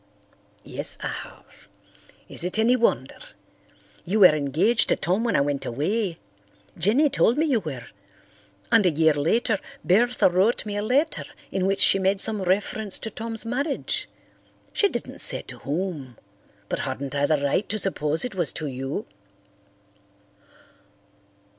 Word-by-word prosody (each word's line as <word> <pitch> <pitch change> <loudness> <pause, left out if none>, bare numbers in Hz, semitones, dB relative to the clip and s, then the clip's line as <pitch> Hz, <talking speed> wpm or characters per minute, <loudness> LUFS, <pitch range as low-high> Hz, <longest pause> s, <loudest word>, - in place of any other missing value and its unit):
"Yes, - - -1
I - - -3
have. - - -11 0.6
Is - - -1
it 180 +4 0
any 230 +3 +4
wonder? 235 -2 0 0.8
You 205 +4 0
were 180 -5 +9
engaged 155 - +1
to - - +3
Tom 185 +8 -1
when 230 -4 0
I - - +4
went 140 -1 -1
away, 170 - -2 0.6
Jenny 225 - +3
told 245 -2 +2
me 315 - +2
you 270 -7 +2
were. 135 - -7 0.9
And 220 - +5
a - - +5
year 160 0 +3
later 200 - +1 0.3
Bertha 240 +7 +3
wrote 190 +7 +1
me 205 -1 -4
a 205 - -1
letter 275 +9 0 0.3
in 190 -1 0
which 195 0 0
she 195 - +5
made 190 +1 +1
some 215 0 +2
reference 200 +2 -1
to 220 - -6
Tom's 225 +1 -1
marriage. 275 +5 -2 0.6
She 405 - +3
didn't - - -6
say - - +4
to - - -10
whom, 150 - -4 0.5
but - - -3
hadn't 140 0 -4
I 145 0 +1
the 155 - +2
right 140 +8 -1
to 215 - -1
suppose 160 -4 0
it 250 - -5
was 175 -4 0
to 155 - -4
you?" 135 0 -4
195 Hz, 155 wpm, -24 LUFS, 155-225 Hz, 0.9 s, were